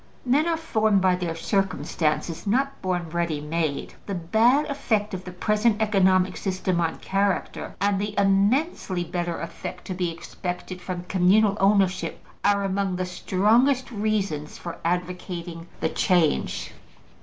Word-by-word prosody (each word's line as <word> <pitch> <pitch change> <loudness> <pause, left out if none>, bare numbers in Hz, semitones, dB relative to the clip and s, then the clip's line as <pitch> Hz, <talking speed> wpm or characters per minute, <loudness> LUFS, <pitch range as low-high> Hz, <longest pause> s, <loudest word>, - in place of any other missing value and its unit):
Men 285 +6 +3
are 335 -1 +1
formed 220 -10 +2
by 185 -1 +3
their 175 -2 -3
circumstances, 170 -2 -1
not 270 +6 0
born 175 -3 -2
ready 170 -3 -1
made. 150 -1 -2
The 200 - -2
bad 225 - +3
effect 220 -7 -1
of 185 0 -5
the 180 - -6
present 210 +4 +1
economic 190 -3 +3
system 185 -2 -1
on 165 -1 -1
character, 195 0 -1
and 200 -1 +1
the 205 0 -4
immensely 200 - +2
better 175 0 -3
effect 165 0 -7
to 185 - -4
be 180 -1 -1
expected 180 +2 -6
from 180 -1 -5
communal 195 +3 +3
ownership, 195 -2 +2 0.2
are 200 0 +3
among 195 -1 0
the 185 0 -2
strongest 230 +9 +2
reasons 200 -9 -2
for 170 - -7
advocating 175 -1 -3
the 160 - +1
change. 175 -5 +1
190 Hz, 140 wpm, -25 LUFS, 175-210 Hz, 0.2 s, Men